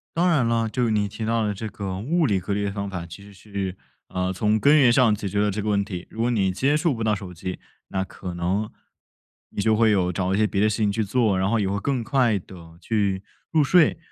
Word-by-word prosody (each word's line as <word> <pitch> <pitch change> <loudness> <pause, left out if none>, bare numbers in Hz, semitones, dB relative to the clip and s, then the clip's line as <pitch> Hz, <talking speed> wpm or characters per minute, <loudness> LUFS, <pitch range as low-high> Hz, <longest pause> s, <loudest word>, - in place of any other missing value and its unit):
当 175 +2 +3
然 135 -8 +3
了， 115 -1 +1
就 125 +2 0
是 110 - 0
你 105 -1 +1
提 110 +2 -6
到 115 0 +1
的 105 - -1
这 110 +2 -5
个 95 -2 -5
物 155 - +1
理 100 -4 +1
隔 100 +3 -3
离 100 - -1
的 100 - -1
方 100 0 -4
法， 90 -3 -5
其 90 +4 -11
实 100 - -14
是， 100 -2 -5 0.3
呃， 90 0 -1
从 105 +3 +1
根 145 +5 +5
源 125 -5 +5
上 125 -5 +4
解 105 -1 -5
决 100 +2 -1
了 105 - +2
这 105 +2 -3
个 105 - -2
问 100 -1 +2
题。 95 -4 -6
如 115 - -5
果 120 - +2
你 100 -5 +1
接 135 +10 +1
触 160 -2 +1
不 115 -1 -4
到 110 -1 +2
手 95 -2 -8
机， 90 +2 -5 0.3
那 95 0 -2
可 90 -2 -8
能 95 +5 -1 0.8
你 - - -7
就 110 0 +3
会 110 0 +4
有 95 -4 +2
找 95 +1 -1
一 - - 0
些 110 - +3
别 100 -1 0
的 110 - +4
事 105 - -2
情 105 -3 +1
去 110 +2 0
做， 105 -2 +1
然 95 +1 +1
后 115 0 +2
也 100 - 0
会 100 +1 -1
更 130 -2 -1
快 120 -4 +2
地 85 -3 -12
去 100 -3 -1 0.3
入 155 -2 +4
睡， 165 +3 +4
105 Hz, 290 characters per minute, -24 LUFS, 95-115 Hz, 0.8 s, 根